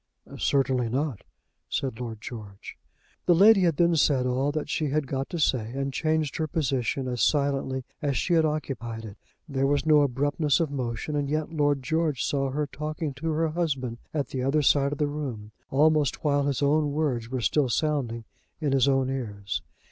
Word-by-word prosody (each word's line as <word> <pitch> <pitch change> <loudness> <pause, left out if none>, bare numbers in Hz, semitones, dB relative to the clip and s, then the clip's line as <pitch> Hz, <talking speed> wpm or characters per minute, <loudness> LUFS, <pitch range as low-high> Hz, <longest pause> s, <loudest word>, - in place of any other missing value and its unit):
"Certainly 130 -3 +1
not," 135 -3 -2 0.5
said 130 -4 -2
Lord 115 -3 -6
George. 105 -4 -9 0.5
The 175 - +6
lady 200 +3 +7
had 170 -5 +2
then 170 -1 +4
said 145 -4 +3
all 130 +3 +1
that 155 0 -3
she 155 - -1
had 145 +1 0
got 135 +1 -3
to 175 - -4
say, 125 -7 +1
and 135 0 -2
changed 155 -1 0
her 160 - -1
position 135 -3 -1
as 125 -1 -2
silently 135 -3 +1 0.2
as 140 -3 0
she 175 - 0
had 165 -1 +5
occupied 125 -7 -3
it. 105 -1 -10 0.3
There 135 -2 0
was 145 +2 +1
no 155 -2 +6
abruptness 145 +3 +1
of 160 -4 0
motion, 130 +2 -3
and 145 -1 -1
yet 155 +2 -2
Lord 145 -3 +1
George 155 -1 0
saw 135 -1 0
her 150 +3 -1
talking 155 +1 -4
to 155 +5 -4
her 160 +1 +1
husband 135 -8 -2
at 145 -4 -2
the 130 - -3
other 140 +4 +2
side 140 0 +3
of 145 - -3
the 150 - +1
room, 135 -8 -5 0.2
almost 150 -1 +2
while 145 -2 +2
his 140 0 0
own 145 0 +2
words 130 -7 -1
were 130 0 -2
still 135 +3 +1
sounding 120 -5 -1 0.3
in 150 -4 0
his 135 -1 +3
own 135 -1 +2
ears. 105 -6 -4
140 Hz, 190 wpm, -26 LUFS, 130-150 Hz, 0.5 s, lady